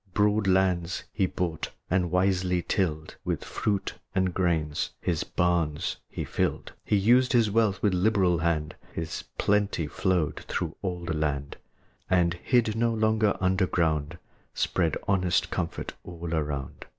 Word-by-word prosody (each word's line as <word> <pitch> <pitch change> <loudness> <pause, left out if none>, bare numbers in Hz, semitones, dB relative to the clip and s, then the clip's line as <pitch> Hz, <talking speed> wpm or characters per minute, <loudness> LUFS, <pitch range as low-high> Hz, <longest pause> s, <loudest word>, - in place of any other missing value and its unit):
Broad 105 0 +3
lands 90 -2 +2
he 95 -3 +2
bought, 85 -5 -3 0.2
and 90 -1 +1
wisely 90 0 +1
tilled; 80 -6 -1
With - - -2
fruits 100 -2 -1 0.2
and 95 -2 +1
grain 80 -5 +1 0.3
his 85 -3 -1
barns 85 -2 0
he - - -4
filled; - - -1
He - - +1
used 120 +6 +4
his 115 -4 +4
wealth 105 -3 +2
with 105 -3 +3
liberal 90 -2 +3
hand; 80 -2 0 0.2
His 80 -1 -4
plenty 100 -5 +1
flowed 90 +1 0
through - - -2
all 90 -3 -3
the 85 - -1
land; 70 -2 -2 0.5
And, 90 -2 +3
hid 110 +4 +1
no 115 +1 +2
longer 110 -1 +2
under 95 0 +2
ground, 80 -5 0 0.4
Spread 80 -4 +1
honest 90 -3 +2
comfort 85 -3 -3
all 85 -1 -6
around. 75 -4 -3
90 Hz, 140 wpm, -27 LUFS, 80-100 Hz, 0.5 s, used